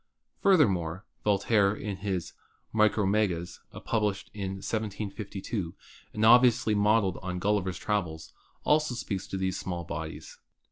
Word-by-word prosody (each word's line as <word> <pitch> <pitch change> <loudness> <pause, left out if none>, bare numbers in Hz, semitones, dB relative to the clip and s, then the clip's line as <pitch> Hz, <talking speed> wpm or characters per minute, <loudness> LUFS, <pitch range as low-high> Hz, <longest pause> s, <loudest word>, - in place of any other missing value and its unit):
Furthermore, 95 - +3 0.2
Voltaire 100 0 +3
in 105 -2 -5
his 90 -3 -3 0.4
"Micromegas," 105 -4 +1 0.3
published 105 -3 -1
in 100 -2 -4
1752 100 -2 -4 0.4
and 105 +1 0
obviously 120 -2 +6
modeled 105 -2 +2
on 90 0 -4
"Gulliver's 95 -2 0
Travels," 90 -7 -3 0.3
also 150 -4 +2
speaks 100 -5 -4
of 95 - -2
these 95 -1 -1
small 90 -2 -4
bodies. 80 -1 -7
100 Hz, 110 wpm, -28 LUFS, 95-110 Hz, 0.4 s, obviously